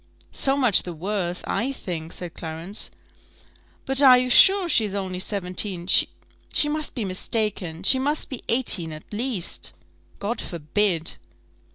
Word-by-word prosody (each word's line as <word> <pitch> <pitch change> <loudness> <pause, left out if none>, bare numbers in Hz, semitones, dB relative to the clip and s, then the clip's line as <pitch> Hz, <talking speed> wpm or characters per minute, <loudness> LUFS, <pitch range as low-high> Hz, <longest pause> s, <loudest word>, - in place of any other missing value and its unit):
"So 270 0 0
much 250 -8 +5
the 175 - -7
worse, 180 0 -3
I 260 +4 -2
think," 165 -10 -7
said 175 -2 -8
Clarence. 165 +5 -5 1.0
"But 270 +1 +3
are 260 -3 +8
you 250 0 -1
sure 385 +6 +7
she's 215 - +1
only 190 -2 -4
seventeen? 185 -2 -3
she 295 - +2
must 305 -1 -4
be 235 -5 -3
mistaken 185 -3 -3
she 260 +7 +6
must 290 +3 -1
be 260 - -7
eighteen, 205 -10 +1
at 155 - -10
least." 220 -5 -2 0.4
"God 220 +3 -4
forbid!" 170 +1 -2
205 Hz, 140 wpm, -23 LUFS, 175-255 Hz, 1.0 s, are